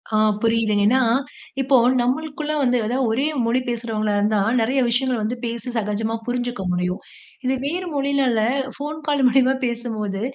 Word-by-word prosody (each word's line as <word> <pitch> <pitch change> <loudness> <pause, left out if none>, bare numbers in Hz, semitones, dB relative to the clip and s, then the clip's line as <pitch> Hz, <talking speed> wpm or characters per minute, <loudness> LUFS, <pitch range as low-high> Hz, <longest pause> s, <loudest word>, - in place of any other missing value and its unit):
ஆ - - +4 0.2
புரியுதுங்க, 225 -3 +2
ஏன்னா 260 +3 +4 0.6
இப்போ 270 +1 +3 0.3
நம்மளுக்குள்ள 300 +4 -2
வந்து 250 -1 +3
ஏதாவது 250 +3 0
ஒரே 270 +6 +1 0.2
மொழி 235 +2 +2
பேசுகிறவங்களா 220 -3 -1
இருந்தா, 210 +1 +2 0.2
நெறைய 260 +4 +1
விஷயங்கள் 245 -1 0
வந்து 225 +3 -1
பேசி 235 +1 -4
சகஜமா 220 +1 -1
புரிஞ்சுக்க 245 -3 -2
முடியும். 180 +1 -1 0.4
இது 260 - +2
வேறு 355 +5 -2
மொழினால 275 -4 +1 0.4
ஃபோன் 300 +2 -5
கால் 285 -2 +2
மூலியமா 260 +1 +4
பேசும்போது, 225 -5 -3
245 Hz, 145 wpm, -22 LUFS, 220-270 Hz, 0.6 s, ஆ